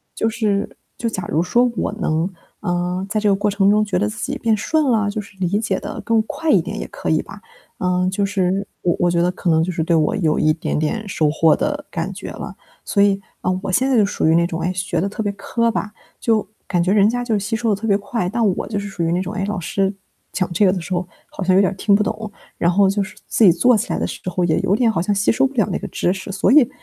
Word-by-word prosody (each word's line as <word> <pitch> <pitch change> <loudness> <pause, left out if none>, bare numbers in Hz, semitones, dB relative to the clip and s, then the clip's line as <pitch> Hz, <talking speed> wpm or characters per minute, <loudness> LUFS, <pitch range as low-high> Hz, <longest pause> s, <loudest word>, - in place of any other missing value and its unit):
就 225 - 0
是 215 -3 0 0.3
就 235 - -2
假 195 -5 -3
如 160 - +1
说 240 +7 +2
我 - - -1
能， 165 -4 -1 0.3
啊， 180 +1 -2
在 215 0 0
这 210 - +3
个 195 - +4
过 205 +1 0
程 200 0 +2
中 215 0 +3
觉 190 -3 -1
得 210 +2 +1
自 215 - -8
己 280 - -3
变 225 -3 +2
顺 310 +9 +1
了， 210 -2 +2
就 210 +1 -3
是 195 -1 -16
理 180 - 0
解 200 -4 -1
得 - - -6
更 230 -1 +2
快 320 +7 -2
一 - - +5
点 - - -6
也 - - -4
可 - - -5
以 - - +2
吧。 - - -12 0.4
嗯， 180 0 +1
就 200 +1 0
是 195 0 0
我 175 - +2
我 175 - +3
觉 170 0 +2
得 180 +1 +2
可 180 -1 -3
能 160 0 +4
就 180 - -1
是 165 - -2
对 170 0 +2
我 155 +5 +2
有 160 -5 +1
一 155 0 +3
点 160 - -2
点 205 +8 -2
收 155 -5 +1
获 160 0 +4
的 295 -1 -2
感 - - -3
觉 - - -7
了。 - - -7 0.3
所 200 - +1
以， 200 -1 +3 0.2
嗯， 185 0 +1
我 190 - -2
现 260 +8 +2
在 260 - +3
就 210 - +5
属 200 - -1
于 160 - +4
那 170 0 +4
种， 170 -1 -4
哎， 180 +2 -1
学 185 -2 -2
得 195 - 0
特 210 +2 -4
别 205 - 0
磕 230 +3 0
巴， 215 - -2 0.3
就 220 -3 +1 0.2
感 175 -3 +1
觉 185 - +1
人 205 0 +5
家 245 +1 -1
就 235 -2 -1
是 205 - +2
吸 205 +3 -2
收 230 0 -1
得 - - +1
特 225 - -2
别 200 -1 +4
快。 200 -1 -3
但 230 +3 0
我 - - -4
就 210 -1 -3
是 200 0 -4
属 180 - -6
于 165 +1 +1
那 180 - +1
种， 190 +3 -5
哎， 195 -2 -2
老 205 -2 -3
师 195 +3 -1 0.4
讲 185 -2 -1
这 200 +4 +3
个 185 - +4
的 180 - -3
时 175 +3 -5
候， 180 0 -1 0.2
好 - - -9
像 185 0 +3
有 195 - +6
点 195 - +2
儿 - - -7
听 200 0 +3
不 210 - +3
懂。 215 +1 -4 0.3
然 170 - +2
后 195 +2 +4
就 200 +1 0
是 190 -1 -6
自 225 - +3
己 175 - +7
做 230 +7 +4
起 - - -2
来 - - -1
的 - - -1
时 - - -6
候 180 0 -1
也 160 -2 +2
有 195 - +1
点 230 -1 +3
好 165 - -1
像 205 +2 0
吸 195 - +2
收 265 +4 +3
不 275 - -14
了 220 -7 +2
那 - - -1
个 - - -6
知 175 - 0
识， 190 +1 -5
所 195 +5 +1
以 275 -4 +6
195 Hz, 315 characters per minute, -20 LUFS, 180-215 Hz, 0.4 s, 己